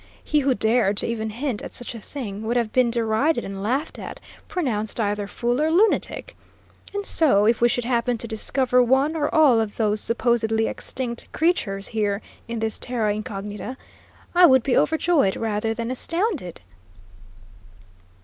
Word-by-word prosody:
He 300 - +1
who 270 -2 +1
dared 220 -1 +2
to - - 0
even 220 -1 -3
hint 240 0 -3
at - - -8
such 245 - -5
a 230 - -8
thing 210 -4 -7
would 230 +2 -1
have 230 -3 -1
been 255 -2 +3
derided 235 +6 0
and 195 0 -6
laughed 260 +10 -2
at, - - -8 0.3
pronounced 240 - -2
either 205 -1 -1
fool 240 +5 -1
or 310 - +2
lunatic. 430 +7 +1 0.6
And 405 0 -4
so, 260 - +4
if 230 +1 +2
we 240 - +5
should 245 -1 -1
happen 240 0 0
to 230 - -4
discover 250 +3 +2
one 265 +6 +2
or 295 -2 0
all 290 -7 +5
of 210 -2 -4
those 210 -2 +1
supposedly 230 -2 +1
extinct 240 0 -3
creatures 205 - 0
here 210 -2 -1 0.2
in 230 0 -4
this 220 -1 -1
terra 225 -4 0
incognita, 210 +3 -6 0.6
I 355 0 +7
would 260 -4 +5
be 270 - +1
overjoyed 320 - +2
rather 220 0 -2
than 230 +2 -3
astounded." 330 - -2
235 Hz, 165 wpm, -23 LUFS, 215-270 Hz, 0.6 s, I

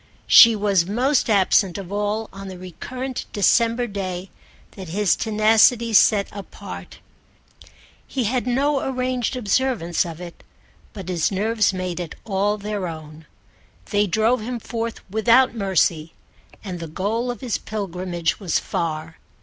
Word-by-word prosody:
She 230 -1 +8
was 200 -4 +1
most 250 +6 +1
absent 195 -2 +3
of 195 -2 -8
all 210 +2 -1
on 195 0 -8
the 185 -1 -8
recurrent 250 +9 -6
December 230 +4 +2
day 190 -3 -5 0.4
that 190 -4 -9
his 200 +1 +2
tenacity 225 +2 +3
set 200 -1 +5
apart. 200 -1 -9 1.1
He 260 - -2
had 245 +3 -1
no 275 +3 +1
arranged 255 -1 -2
observance 230 -6 0
of 165 -2 -8
it, 175 -1 -10 0.5
but 195 -4 -9
his 175 -1 0
nerves 210 +2 +1
made 185 -2 -4
it 175 -3 -6
all 205 0 0
their 205 -2 -4
own. 155 -1 -9 0.6
They 205 -1 +2
drove 220 +5 +2
him 240 +2 -4
forth 230 0 -5
without 235 +4 +4
mercy, 180 -6 0 0.5
and 185 -4 -6
the 165 - -6
goal 215 +9 -2
of 240 -3 -5
his 245 -4 -2
pilgrimage 180 -5 -3
was 185 -6 0
far. 160 -1 -4
205 Hz, 140 wpm, -22 LUFS, 180-230 Hz, 1.1 s, She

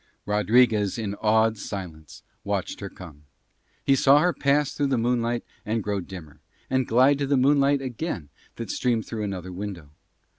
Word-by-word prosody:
Rodriguez 105 0 +3
in 105 -3 -3
awed 110 0 +3
silence 85 -8 -8 0.2
watched - - -3
her - - -6
come. 75 -2 -13 0.6
He 135 - +4
saw 135 +1 +5
her 175 +4 +3
pass 140 0 +1
through 145 - 0
the 135 -2 +1
moonlight 120 0 0 0.2
and 110 0 -2
grow 100 -1 -2
dimmer, 80 -5 -10 0.3
and 130 -1 +1
glide 130 +5 +4
to 140 - -1
the 140 0 +2
moonlight 140 +1 +3
again 125 - -4 0.3
that 115 - -5
streamed 120 -3 0
through 110 -2 -5
another 95 -3 -5
window. 90 -5 -7
115 Hz, 160 wpm, -25 LUFS, 100-135 Hz, 0.6 s, saw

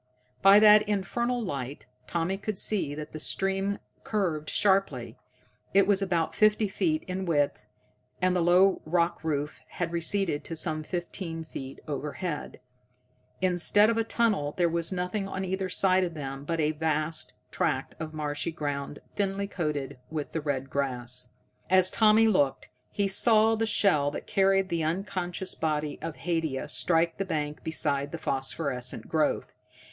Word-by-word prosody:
By 195 +1 +8
that 210 0 +8
infernal 235 +5 -1
light 140 - -5 0.2
Tommy 170 +3 -1
could 200 +1 -4
see 185 -10 -1
that 150 0 -7
the 155 - -7
stream 195 +4 -1 0.3
curved 170 -8 -1
sharply. 195 -1 +1 0.6
It 195 -1 +6
was 200 0 +3
about 170 -4 0
fifty 215 0 +3
feet 310 - 0
in 185 0 -4
width, 145 -8 +1 0.6
and 185 0 +2
the 180 - +2
low 180 +3 +4
rock 170 +1 0
roof 150 -2 -2
had 170 -2 -3
receded 170 -2 -1
to 165 - -5
some 155 -1 0
fifteen 170 0 -5
feet 135 -4 -8
overhead. 150 +3 -4 0.8
Instead 185 +4 +4
of 230 - -1
a - - +2
tunnel, 210 -11 0
there 175 -1 +3
was 170 +1 0
nothing 185 +2 -2
on 190 0 -3
either 190 0 -2
side 185 0 +3
of 170 -2 -3
them 135 -1 -6
but 165 +1 -2
a 155 0 +2
vast 155 0 -1 0.2
tract - - -1
of 160 -1 -5
marshy 150 +1 -3
ground 145 -2 -4 0.2
thinly 200 0 -1
coated 150 -9 -3
with 155 -2 -4
the 160 - -2
red 135 -2 -3
grass. 125 -2 -1 0.4
As 185 0 +5
Tommy 220 0 +5
looked, 145 -11 +1 0.2
he 200 -1 0
saw 220 +2 +4
the 225 0 0
shell 155 -10 +3
that 145 - -6
carried 195 -1 +2
the 170 -2 -1
unconscious 180 +2 -1
body 150 -2 -2
of 165 -2 -5
Haidia 160 -6 -2
strike 165 +1 +1
the - - +1
bank 150 -5 -3
beside 145 -3 0
the 170 - -4
phosphorescent 135 -3 -3
growth. 155 -2 0
170 Hz, 155 wpm, -28 LUFS, 150-195 Hz, 0.8 s, By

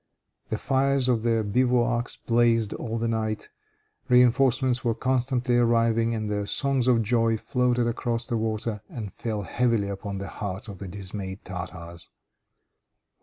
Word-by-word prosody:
The 110 - -1
fires 135 +1 +1
of 120 -3 +2
their 115 -1 +1
bivouacs 120 +2 +1
blazed 115 -2 +2
all 115 -1 -4
the 115 0 -1
night, 110 -1 -2 0.6
reinforcements 125 0 +4
were 115 -2 +1
continually 125 0 +1
arriving, 115 -1 +2
and 110 -1 -3
their 105 -1 -2
songs 135 -1 +1
of 120 -3 +4
joy 115 0 +2
floated 125 +1 +1
across 115 0 -1
the 120 - -2
water, 110 -1 -2
and 110 -5 -6
fell 110 -3 -3
heavily 115 -1 0
upon 100 0 -5
the 100 0 -5
hearts 100 +1 -5
of 100 -4 -9
the 100 - -6
dismayed 95 0 -6
Tartars. 85 -2 -8
115 Hz, 145 wpm, -26 LUFS, 105-125 Hz, 0.6 s, reinforcements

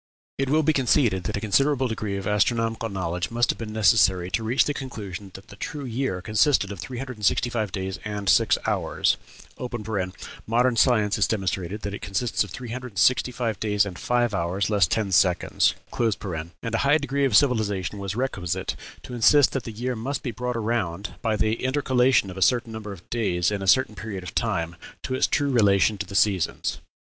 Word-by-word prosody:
It 135 -1 0
will 155 +2 +3
be 155 +1 +3
conceded 120 - +2
that 105 - -2
a - - -4
considerable 135 +5 +2
degree 105 -3 -3
of 95 - -5
astronomical 115 +2 0
knowledge 90 -3 -3
must 120 +1 +2
have - - -10
been 110 -2 -5
necessary 95 -4 +3
to 110 +5 -1
reach 120 +4 +2
the 145 - -1
conclusion 105 -8 -7
that 95 - -12
the 100 - -11
true 145 +7 -5
year 120 -7 -2
consisted 105 0 +2
of 100 - -7
three 95 +8 -6
hundred 130 -1 -6
and 105 - -3
sixty 120 0 +1
five 110 -5 -2
days 95 -1 -4
and 105 -2 -5
six - - +4
hours - - +1 1.3
(modern 120 +2 +2
science 110 -4 +3
has 100 - +2
demonstrated 95 -1 -2
that 100 - -4
it 105 - -6
consists 105 +5 0
of 105 - -9
three 120 +7 -8
hundred 125 0 -6
and - - -13
sixty 125 +4 +3
five 115 -3 -3
days 105 -2 +2
and 95 -3 -7
five 120 -2 +1
hours, 95 +3 -1
less 100 -4 +4
ten 100 +3 -1
seconds); 90 -2 +3 0.3
and 100 -2 -3
a 115 - +1
high 140 +3 +4
degree 140 -1 -1
of 125 -6 +4
civilization 105 -7 +1
was 100 0 -4
requisite 105 -9 -2 0.3
to - - -9
insist 125 +4 +5
that 135 - -3
the 115 - -5
year 120 +4 -3
must 130 +6 -4
be 125 - -2
brought 125 0 -3
around, 105 -4 -2
by 110 -2 0
the 110 +1 0
intercalation 130 -5 +2
of 90 - -10
a - - -5
certain 120 +4 +2
number 105 -2 -6
of 95 -3 -11
days 90 -6 0
in 100 -1 -2
a 95 - -4
certain 120 +2 +4
period 100 -3 -6
of 90 - -8
time, 85 +1 -1 0.3
to 130 - -3
its 130 - +2
true 145 -1 +1
relation 105 -3 +4
to 100 - -4
the 100 - -8
seasons. 100 -3 +1
110 Hz, 205 wpm, -25 LUFS, 95-125 Hz, 1.3 s, insist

